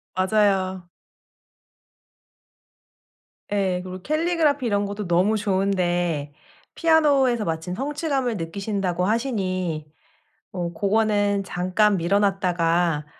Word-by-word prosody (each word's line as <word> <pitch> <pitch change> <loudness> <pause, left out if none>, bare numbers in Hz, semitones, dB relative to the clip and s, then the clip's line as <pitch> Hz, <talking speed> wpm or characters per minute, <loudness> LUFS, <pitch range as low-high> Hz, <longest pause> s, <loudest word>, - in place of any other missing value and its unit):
맞아요. 190 -2 +1 2.6
예. 190 -3 0
그리고 185 0 -8
캘리그라피 310 - +1
이런 205 -2 +1
것도 200 0 -5
너무 180 +5 +2
좋은데 175 -6 0 0.4
피아노에서 285 -8 +3
마침 165 +2 -3
성취감을 275 - -2
느끼신다고 185 +1 -2
하시니 185 - -2 0.6
어 175 -2 -3
고거는 205 +1 +1
잠깐 190 +3 +1
미뤄 175 +4 +2
놨다가 175 -5 +1
195 Hz, 230 characters per minute, -23 LUFS, 180-220 Hz, 2.6 s, 피아노에서